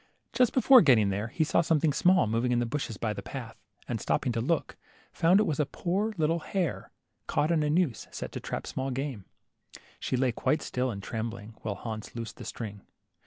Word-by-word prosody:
Just 250 Hz, -2 st, +4 dB
before 260 Hz, -1 st, +7 dB
getting 120 Hz, -, +5 dB
there, 100 Hz, +3 st, -2 dB
he 160 Hz, +8 st, 0 dB
saw 155 Hz, -, +3 dB
something 160 Hz, -2 st, +2 dB
small 180 Hz, +5 st, +4 dB
moving 115 Hz, +3 st, 0 dB
in 120 Hz, -, +2 dB
the 120 Hz, -, +1 dB
bushes 115 Hz, -4 st, -3 dB
by 110 Hz, 0 st, -1 dB
the 100 Hz, -, -6 dB
path, 115 Hz, +3 st, -7 dB, 0.3 s
and 115 Hz, -4 st, -3 dB
stopping 130 Hz, -, 0 dB
to 115 Hz, -1 st, -1 dB
look, 160 Hz, +7 st, -1 dB, 0.4 s
found 175 Hz, +4 st, +4 dB
it -, -, +4 dB
was 155 Hz, -8 st, -1 dB
a 150 Hz, -, +3 dB
poor 190 Hz, +9 st, -1 dB
little 165 Hz, +1 st, +1 dB
hare, 180 Hz, 0 st, -2 dB, 0.4 s
caught 155 Hz, +3 st, +1 dB
in 165 Hz, -2 st, +3 dB
a 150 Hz, -, +1 dB
noose 155 Hz, -6 st, +1 dB
set -, -, -6 dB
to -, -, -5 dB
trap -, -, -5 dB
small 135 Hz, 0 st, -3 dB
game. 130 Hz, -6 st, -4 dB, 0.7 s
She 130 Hz, -, -1 dB
lay 130 Hz, -1 st, +2 dB
quite 150 Hz, +6 st, 0 dB
still 130 Hz, +1 st, -1 dB
and 100 Hz, -4 st, -5 dB
trembling, 110 Hz, -1 st, -5 dB
while 105 Hz, -2 st, -3 dB
Hans 110 Hz, +2 st, -7 dB
loosed 115 Hz, -1 st, -6 dB
the -, -, -9 dB
string. 105 Hz, -3 st, -6 dB
130 Hz, 210 wpm, -29 LUFS, 115-160 Hz, 0.7 s, before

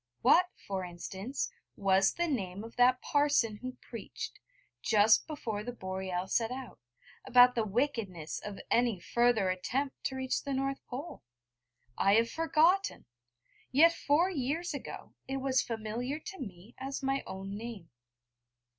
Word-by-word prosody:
What, 360 Hz, +1 st, +6 dB
for 195 Hz, -2 st, -4 dB
instance, 190 Hz, +8 st, -4 dB, 0.2 s
was 195 Hz, -1 st, +3 dB
the 345 Hz, 0 st, 0 dB
name 200 Hz, -, -2 dB
of 230 Hz, -, -10 dB
that 250 Hz, +1 st, +4 dB
parson 285 Hz, -7 st, +2 dB
who 255 Hz, +3 st, -6 dB
preached, 230 Hz, -4 st, -7 dB, 0.4 s
just 215 Hz, +1 st, +4 dB
before 230 Hz, -9 st, -4 dB
the 245 Hz, -, -4 dB
Boreal 190 Hz, -4 st, -4 dB
set 225 Hz, +3 st, +1 dB
out, 255 Hz, 0 st, -7 dB, 0.4 s
about 250 Hz, -1 st, +7 dB
the 230 Hz, -, +1 dB
wickedness 210 Hz, -, -2 dB
of 205 Hz, -1 st, -7 dB
any 235 Hz, -5 st, +3 dB
further 235 Hz, -2 st, +2 dB
attempt 260 Hz, +9 st, -2 dB
to 265 Hz, -, -1 dB
reach 260 Hz, 0 st, -1 dB
the 280 Hz, -, -3 dB
North 270 Hz, +1 st, -2 dB
Pole? 280 Hz, +7 st, -6 dB, 0.8 s
I 200 Hz, +1 st, +5 dB
have 230 Hz, +1 st, +3 dB
forgotten! 330 Hz, +4 st, +2 dB, 0.7 s
Yet 330 Hz, +6 st, +6 dB
four 335 Hz, +5 st, +2 dB
years 315 Hz, +3 st, -2 dB
ago 285 Hz, -, -7 dB
it 270 Hz, 0 st, -2 dB
was 265 Hz, -1 st, +2 dB
familiar 230 Hz, +5 st, -3 dB
to 385 Hz, +3 st, -9 dB
me 200 Hz, -2 st, -9 dB
as 270 Hz, +1 st, -4 dB
my 270 Hz, 0 st, +1 dB
own 195 Hz, +1 st, -6 dB
name. 210 Hz, -7 st, -7 dB
245 Hz, 145 wpm, -31 LUFS, 200-275 Hz, 0.8 s, about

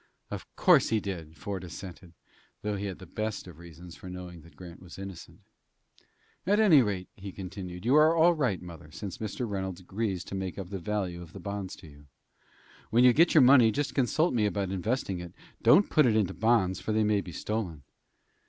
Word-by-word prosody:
"Of -, -, -6 dB
course -, -, +5 dB
he 110 Hz, -, +2 dB
did," 85 Hz, -6 st, -6 dB
Ford 100 Hz, -3 st, -5 dB
assented, 90 Hz, 0 st, -10 dB, 0.5 s
though 105 Hz, 0 st, -1 dB
he 100 Hz, 0 st, -3 dB
had 95 Hz, -, -6 dB
the 95 Hz, -, -11 dB
best 110 Hz, +4 st, -4 dB
of 85 Hz, -3 st, -12 dB
reasons 85 Hz, 0 st, -12 dB
for 90 Hz, -, -10 dB
knowing 90 Hz, -2 st, -8 dB
that 85 Hz, +2 st, -18 dB
Grant 90 Hz, -1 st, -11 dB
was 90 Hz, -2 st, -12 dB
innocent. 95 Hz, -3 st, -9 dB, 1.1 s
"At 205 Hz, +2 st, +3 dB
any 180 Hz, -10 st, +7 dB
rate," 100 Hz, -5 st, -2 dB
he 100 Hz, 0 st, -9 dB
continued, 90 Hz, -1 st, -8 dB
"you 125 Hz, -, +3 dB
are 155 Hz, +2 st, +6 dB
all 170 Hz, +1 st, +5 dB
right, 125 Hz, -, 0 dB
mother, 85 Hz, -3 st, -11 dB
since 90 Hz, +4 st, -7 dB
Mr. 110 Hz, +3 st, -4 dB
Reynolds 95 Hz, -3 st, -4 dB
agrees 95 Hz, 0 st, -3 dB
to -, -, -10 dB
make 95 Hz, -1 st, -4 dB
up 95 Hz, -1 st, -7 dB
the 100 Hz, -, -4 dB
value 90 Hz, -2 st, -3 dB
of 85 Hz, -1 st, -12 dB
the -, -, -8 dB
bonds 100 Hz, -2 st, -5 dB
to 90 Hz, -, -14 dB
you. 70 Hz, -1 st, -16 dB, 0.8 s
When 120 Hz, +2 st, +4 dB
you 125 Hz, -1 st, +7 dB
get 170 Hz, +5 st, +4 dB
your 150 Hz, -, +8 dB
money, 125 Hz, -3 st, +7 dB
just 145 Hz, +5 st, -2 dB
consult 145 Hz, +5 st, +1 dB
me 110 Hz, -4 st, +2 dB
about 100 Hz, -2 st, -2 dB
investing 95 Hz, 0 st, -2 dB
it. 85 Hz, -1 st, -9 dB, 0.3 s
Don't 205 Hz, -, +5 dB
put 155 Hz, -5 st, +5 dB
it 110 Hz, -, +2 dB
into 100 Hz, -4 st, +1 dB
bonds, 100 Hz, -1 st, +2 dB
for 110 Hz, -, -3 dB
they 110 Hz, 0 st, +2 dB
may 105 Hz, -1 st, +2 dB
be 90 Hz, -, -9 dB
stolen." 90 Hz, -5 st, -4 dB
95 Hz, 210 wpm, -29 LUFS, 90-110 Hz, 1.1 s, your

